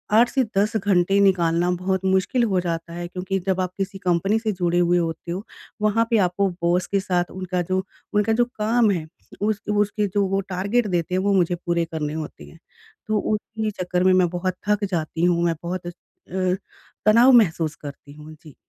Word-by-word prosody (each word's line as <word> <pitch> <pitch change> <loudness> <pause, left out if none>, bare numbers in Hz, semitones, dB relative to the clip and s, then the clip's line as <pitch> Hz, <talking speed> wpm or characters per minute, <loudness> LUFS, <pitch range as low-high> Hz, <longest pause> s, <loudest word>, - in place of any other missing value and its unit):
8 235 +2 +6
से 265 -2 +1
10 210 +3 +2
घंटे 195 -1 +2
निकालना 175 -3 +3
बहुत 190 +1 -1
मुश्किल 190 +6 +2
हो 195 -5 +1
जाता 170 -1 -4
है, 175 0 -5
क्योंकि 185 +2 -3
जब 190 -1 +1
आप 180 -1 -2
किसी 195 0 -3
कंपनी 195 +3 +1
से 220 -1 -1
जुड़े 175 -2 0
हुए 175 0 +3
होते 170 0 -3
हो, 190 +4 -4 0.4
वहाँ 215 +2 +2
पे 230 - +3
आपको 180 +3 0 0.2
बॉस 175 +1 +2
के 200 - +1
साथ 180 -2 -1
उनका 185 -1 -3
जो 185 +2 -1 0.3
उनका 210 +2 +2
जो 240 +1 +3
काम 225 0 +3
है, 165 -5 -2 0.3
उस 210 0 0
उसके 205 0 +1
जो 205 -1 +2
वो 195 +1 0
टारगेट 200 +5 0
देते 180 0 -1
हैं 185 - +1
वो 200 0 +1
मुझे 175 -2 +2
पूरे 170 -1 -1
करने 155 -2 -4
होते 155 -1 -6
हैं। 165 - -16 0.5
तो 215 0 +1
उन्ही 215 +1 -2
चक्कर 180 0 0
में 185 0 +5
मैं 185 -1 +3
बहुत 180 +1 -2
थक 210 0 +1
जाती 165 -1 -2
हूँ, 175 -1 +2
मैं 165 -1 +1
बहुत 175 0 -4
अ - - -2
स - - -10 0.4
अ, 185 -1 0 0.5
तनाव 235 +5 +6
महसूस 165 -9 +3
करती 145 -1 -10
हूँ। 150 +1 -12
जी। 155 -2 -16
185 Hz, 205 wpm, -23 LUFS, 175-205 Hz, 0.5 s, 8